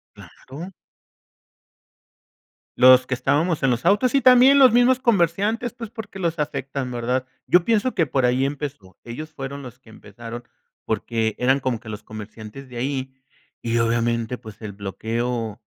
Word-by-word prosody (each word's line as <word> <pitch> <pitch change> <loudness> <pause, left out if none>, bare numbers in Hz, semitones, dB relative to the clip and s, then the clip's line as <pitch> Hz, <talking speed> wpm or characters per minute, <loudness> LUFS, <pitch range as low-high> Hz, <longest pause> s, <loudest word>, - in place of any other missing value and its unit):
¡Claro! 165 +9 -11 2.1
Los 130 0 +7
que - - -11
estábamos 150 +6 +1
en 135 - +3
los 120 0 -1
autos, 210 +8 +3
y 275 - +3
también 255 +2 +7
los 260 -4 +7
mismos 245 +1 +4
comerciantes, 215 - +1
pues, 230 -3 -8
porque 220 -4 -9
los 170 -2 -2
afectan, 140 -2 -3
¿verdad?, 125 +2 -2 0.2
yo 180 -1 +4
pienso 230 +2 +1
que 165 -5 +2
por 130 0 0
ahí 125 +2 +2
empezó. 140 - -7
Ellos 155 +7 -7
fueron 140 -1 -7
los 125 -1 -11
que 125 -4 -19
empezaron 115 +3 -10 0.4
porque 110 -2 -1
eran 135 +2 +2
como 125 -4 -2
que 110 - -10
los 105 0 -7
comerciantes 110 +4 -10
de 120 - -7
ahí, 130 0 -3 0.5
y 115 0 -2
obviamente 115 +1 0
pues, 110 0 -13
el 105 -2 -6
bloqueo 110 +3 -4
130 Hz, 155 wpm, -22 LUFS, 115-175 Hz, 2.1 s, Los